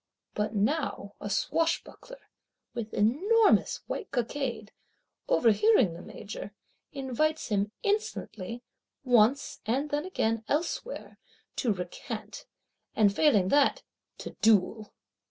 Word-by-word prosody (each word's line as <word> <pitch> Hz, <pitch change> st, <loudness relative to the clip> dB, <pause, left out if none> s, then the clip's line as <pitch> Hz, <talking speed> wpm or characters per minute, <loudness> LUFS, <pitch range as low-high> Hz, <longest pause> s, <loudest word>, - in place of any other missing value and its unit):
But 210 Hz, +1 st, -2 dB
now 215 Hz, -2 st, -1 dB
a 205 Hz, -, -4 dB
swashbuckler, 330 Hz, -, -2 dB, 0.5 s
with 230 Hz, -3 st, -5 dB
enormous 390 Hz, -, +3 dB
white 425 Hz, -, -5 dB
cockade, 245 Hz, -3 st, -3 dB, 0.6 s
overhearing 245 Hz, -, +4 dB
the 170 Hz, -, -9 dB
Major, 205 Hz, +1 st, -8 dB, 0.4 s
invites 295 Hz, +3 st, -1 dB
him 205 Hz, -1 st, 0 dB
insolently, 245 Hz, -, -2 dB, 0.4 s
once 245 Hz, +2 st, +3 dB
and 275 Hz, +6 st, 0 dB
then 290 Hz, +1 st, 0 dB
again 225 Hz, -11 st, -1 dB
elsewhere, 345 Hz, +10 st, -3 dB, 0.4 s
to 240 Hz, -, +1 dB
recant; 180 Hz, -3 st, -6 dB, 0.5 s
and 205 Hz, -2 st, +4 dB
failing 210 Hz, -12 st, +4 dB
that, 285 Hz, +3 st, +3 dB, 0.3 s
to -, -, -7 dB
duel. 215 Hz, 0 st, +3 dB
240 Hz, 100 wpm, -29 LUFS, 210-305 Hz, 0.6 s, overhearing